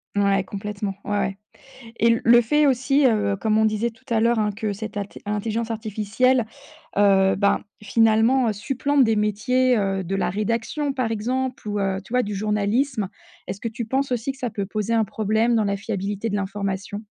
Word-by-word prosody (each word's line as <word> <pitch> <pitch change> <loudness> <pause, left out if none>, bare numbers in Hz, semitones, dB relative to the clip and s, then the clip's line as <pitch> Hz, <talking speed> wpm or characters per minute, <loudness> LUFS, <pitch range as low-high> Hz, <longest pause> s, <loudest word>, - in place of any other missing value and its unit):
Ouais, 200 -1 +2
complètement. 200 -1 -5
Ouais, 205 - -5
ouais 195 0 -2 0.6
et 230 0 +4
le 240 +1 +7
fait 295 +6 +3
aussi, 275 +2 +2
heu, 210 -4 +2
comme 215 +1 +1
on 220 - +4
disait 215 +2 0
tout 225 0 -21
à 225 -1 +2
l'heure, 235 +1 +3
hein, 210 -1 +1
que 210 0 -3
cette 215 +1 -6
at 205 - 0
cette - - -14
intelligence 220 +2 -2
artificielle, 220 +3 +1 0.5
heu, 195 -1 +4
ben, 200 0 +2 0.2
finalement, 225 +3 +3
supplante 270 +6 +1
des 225 -1 +2
métiers, 240 +5 +2
heu, 195 -2 0
de 190 +2 -3
la 195 - 0
rédaction, 230 +9 -1
par 250 -4 -1
exemple 255 +4 -2
ou, 205 - -1
heu, 195 -1 0
tu 225 - -18
vois, 250 0 +3
du 205 -1 -4
journalisme, 210 +3 0 0.4
est-ce 190 +2 -6
que 230 - -2
tu 230 +1 -5
penses 265 +3 -1
aussi 245 +3 -1
que - - -18
ça 250 -3 -3
peut 200 -2 -3
poser 215 +3 -2
un 225 -1 +3
problème 220 +3 +1
dans 220 - +2
la 200 0 0
fiabilité 200 +1 -3
de 205 - -2
l'information? 200 +1 -4
215 Hz, 195 wpm, -23 LUFS, 200-235 Hz, 0.6 s, le